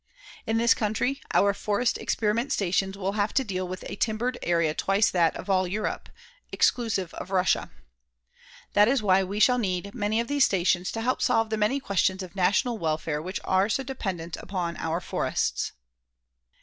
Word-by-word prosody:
In 225 - +1
this 235 0 +5
country, 240 +6 -1
our 200 0 +4
forest 210 +4 0
experiment 230 +4 0
stations 195 0 0
will 195 0 -1
have 205 0 -1
to 265 - +3
deal 185 -5 -3
with 185 +1 -7
a - - -6
timbered 235 +4 -1
area 170 -3 +1
twice 195 +5 +2
that 170 -3 +2
of - - -7
all 185 -2 +2
Europe, 210 +4 -3 0.4
exclusive 215 -8 +1
of - - -7
Russia. 185 -1 +1 1.0
That 205 +1 +6
is 250 -2 +2
why 190 -1 +4
we 200 +3 -4
shall 250 +3 +5
need 195 -2 -2
many 215 -1 0
of 235 - -1
these 285 -1 +2
stations 180 -1 +1
to 225 - -3
help 255 +3 0
solve 225 -3 +2
the - - +1
many 215 +7 +1
questions 190 -4 0
of 185 +1 -11
national 200 +5 +1
welfare 155 -2 -1
which 185 +5 -4
are 190 +2 +2
so 270 - 0
dependent 190 -11 -4
upon 175 -3 -4
our 165 +2 -2
forests. - - -1
200 Hz, 175 wpm, -26 LUFS, 185-225 Hz, 1.0 s, That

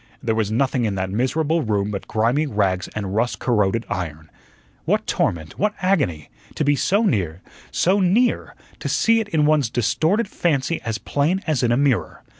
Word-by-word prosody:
There 110 - +1
was 110 -2 0
nothing 130 +1 +1
in 105 -3 -1
that 95 0 -2
miserable 155 - 0
room 105 -4 -1
but 100 - -5
grimy 120 +8 +1
rags 95 -6 0
and 100 -3 -3
rust 120 +3 0
corroded 115 -1 +1
iron. 80 -4 -5 0.5
What - - +1
torment! 80 -2 -2
what 210 +1 +1
agony! 145 - 0 0.2
to - - 0
be 145 0 +3
so 200 +9 +2
near 95 - -1 0.3
so 190 +3 +2
near, 205 +7 +1 0.2
to - - -4
see 230 0 +3
it 220 -2 -3
in 155 -4 +2
one's 150 -5 +3
distorted 160 - +1
fancy 160 -3 -1
as 115 -1 -3
plain 155 - -1
as 155 -6 0
in 120 - +2
a 120 - +3
mirror. 140 -4 0
125 Hz, 180 wpm, -22 LUFS, 105-160 Hz, 0.5 s, be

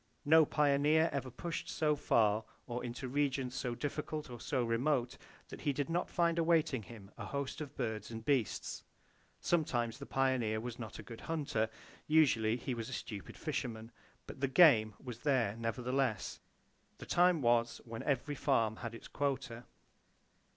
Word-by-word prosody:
No 160 0 +7
pioneer 150 +2 +3
ever 135 -2 -2
pushed 165 +7 -5
so 150 -1 +1
far, 110 -5 +2 0.2
or 120 0 -4
into 125 +2 -5
regions 135 -1 0
so 125 -3 -2
difficult 150 +1 -4
or 120 - -7
so 130 -4 0
remote, 120 +2 +1 0.3
that - - -9
he 145 - +1
did 145 +3 -2
not 175 +2 0
find 170 -1 +2
awaiting 160 -6 +2
him 105 -2 -12
a - - -4
host 140 +1 -3
of 145 -1 -7
birds 110 -4 -3
and 115 -1 -7
beasts. 135 -7 0 0.6
Sometimes 120 -8 0
the 140 - -8
pioneer 130 -5 +1
was 120 +1 -6
not 110 -3 -7
a - - -8
good 115 -2 -10
hunter; 145 -9 -1 0.4
usually 125 -8 +4
he 125 +1 -3
was 115 -1 -4
a - - -6
stupid 105 -6 -6
fisherman; 120 -7 -4 0.3
but - - -10
the 140 - +3
"game" 125 - +6
was 120 -3 -8
there, 120 -7 +1
nevertheless. 125 +1 -1 0.6
The - - -9
time 175 -4 +3
was 120 0 +2
when 115 -1 -6
every 140 +1 0
farm 110 -5 +1
had 115 0 -6
its - - -10
quota. 135 -4 -2
130 Hz, 165 wpm, -34 LUFS, 115-145 Hz, 0.6 s, No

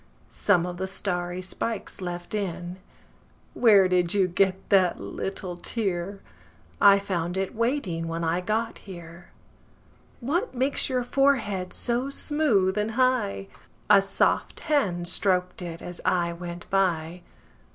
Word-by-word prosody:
Some 180 -4 +2
of 180 0 -5
the 190 +1 -3
starry 180 -2 -3
spikes 205 +2 -4
left 175 0 -5
in. 180 -3 -3 0.8
Where 205 -6 +6
did 180 0 +1
you 195 -2 +3
get 190 +1 0
that 185 -3 +3
little 180 - -5
tear?I 175 - 0
found 180 -3 -2
it 190 0 -2
waiting 220 - -1
when 165 +1 -3
I 165 +2 0
got 220 +4 -2
here. 175 -2 -11 0.9
What 320 - -1
makes 265 +3 0
your 255 -1 0
forehead 240 -8 +1
so 245 +3 0
smooth 250 -11 +2
and 215 +1 -1
high?A 195 - +1
soft 195 0 0
hand 195 - 0
strok'd 180 0 0
it 170 -2 -7
as 175 0 -7
I 170 -1 +1
went 175 0 -8
by. 175 -3 0
185 Hz, 125 wpm, -26 LUFS, 175-215 Hz, 0.9 s, Where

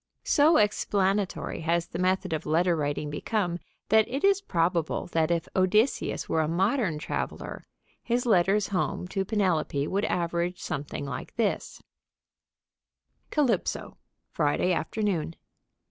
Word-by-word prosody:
So 310 +2 +4
explanatory 200 -2 0
has 170 +1 0
the 170 - -7
method 185 -1 +1
of 155 - -3
letter 170 +3 +3
writing 145 -1 -2
become 175 +2 -1 0.3
that 220 0 +5
it 275 +3 -4
is 395 0 +4
probable 170 - 0
that 160 -1 +2
if 170 -1 0
Odysseus 210 +7 +2
were 160 - +1
a 155 - 0
modern 190 - +1
traveler 150 - -5 0.3
his 245 +1 -1
letters 195 -1 +3
home 185 -2 -1
to 195 0 -1
Penelope 180 -8 0
would 200 +2 0
average 170 +1 -1
something 145 -1 -4
like 130 -2 -6
this: 225 -3 -2 1.5
Calypso, 255 - 0 0.4
_Friday 155 +5 +2
afternoon. 170 -2 -2
180 Hz, 125 wpm, -27 LUFS, 165-210 Hz, 1.5 s, that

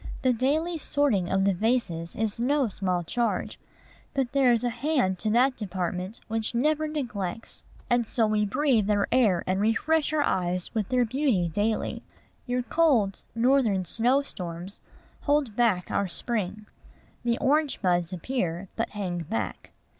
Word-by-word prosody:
The 255 -1 +4
daily 310 +8 0
sorting 260 -13 +1
of 195 0 +2
the 200 - +3
vases 180 -6 -1
is 220 0 -1
no 270 +1 +2
small 185 -3 -1
charge: 235 +7 -2 0.6
but 265 -3 0
there 270 -2 +4
is 235 -1 +2
a 245 - +1
hand 240 - 0
to 215 - -1
that 250 +4 +3
department 185 0 -4
which 225 +1 -1
never 305 +5 +2
neglects; 225 - -4 0.2
and 240 -2 +2
so 225 -1 +1
we 215 0 +1
breathe 225 0 +2
their 205 -1 +2
air 220 -8 +3
and 190 +1 0
refresh 295 +9 +2
our 305 -1 +2
eyes 180 -4 -1
with 215 -4 -1
their 250 -1 +3
beauty 240 - +1
daily. 210 +6 -1 0.5
Your 250 0 0
cold 245 - +2
Northern 230 -6 +3
snow 245 +9 +2
storms 180 -5 -7 0.4
hold 285 -7 +1
back 220 -7 +1
our 200 - +1
spring. 215 +1 -3 0.6
The 235 -1 +1
orange 295 +1 +1
buds 175 -2 +1
appear, 185 -2 -3
but 230 - -1
hang 180 -4 -2
back. 110 - -4
225 Hz, 155 wpm, -27 LUFS, 190-260 Hz, 0.6 s, The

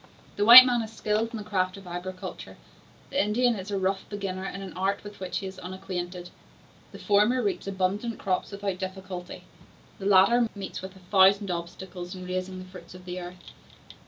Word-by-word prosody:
The 205 - +1
white 245 +3 +13
man 245 -2 +1
is 220 -1 -6
skilled 220 0 -1
in 230 - -5
the 210 - -6
craft 185 -2 -1
of 195 - -12
agriculture; 180 +1 -7 0.5
the 280 - +2
Indian 240 +4 +2
is 190 0 -7
a 200 - -1
rough 190 0 -1
beginner 195 -2 -4
in 195 0 -6
an 190 - -8
art 195 +2 -1
with 205 0 -11
which 185 -1 -4
he 195 - -4
is 190 0 -8
unacquainted. 180 -1 -6 0.6
The - - -10
former 210 +5 +2
reaps 195 -2 -2
abundant 195 +4 -1
crops 185 -2 -2
without 200 -2 -4
difficulty, 185 -1 -7 0.6
the 195 - -3
latter 205 +5 +5
meets 195 -2 -6
with 190 +1 -9
a - - -15
thousand 195 0 +5
obstacles 175 +1 -6
in 185 -1 -8
raising 185 +1 -4
the 185 - -8
fruits 185 0 -13
of 180 0 -13
the 180 0 -5
earth. 180 +1 -11
190 Hz, 190 wpm, -27 LUFS, 185-205 Hz, 0.6 s, white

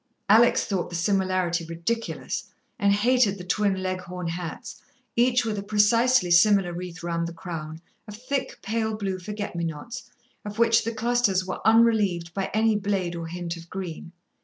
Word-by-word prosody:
Alex 225 +4 +5
thought 195 -5 -2
the 175 - -6
similarity 185 -1 0
ridiculous, 170 +8 -3 0.3
and 200 -2 +3
hated 215 0 +3
the 180 - -8
twin 190 +1 0
Leghorn 185 -1 -4
hats, 170 0 -6 0.3
each 245 0 +3
with 215 -2 -2
a - - -3
precisely 215 0 +3
similar 185 0 +5
wreath 175 -1 -7
round 170 0 -1
the 170 - -7
crown, 160 -2 -7 0.3
of 210 - -8
thick, 265 +2 -3
pale 220 +1 -1
blue 195 -3 -3
forget 205 +1 -5
me 170 - -2
nots, 165 +10 -6 0.3
of 205 0 -7
which 230 0 +4
the 230 - -1
clusters 225 -5 +1
were 185 - -5
unrelieved 210 -7 +3
by 195 -1 -2
any 220 0 +2
blade 195 -4 -1
or 165 -1 -5
hint 175 0 -5
of 165 0 -12
green. 175 -3 -6
195 Hz, 165 wpm, -25 LUFS, 175-220 Hz, 0.3 s, Alex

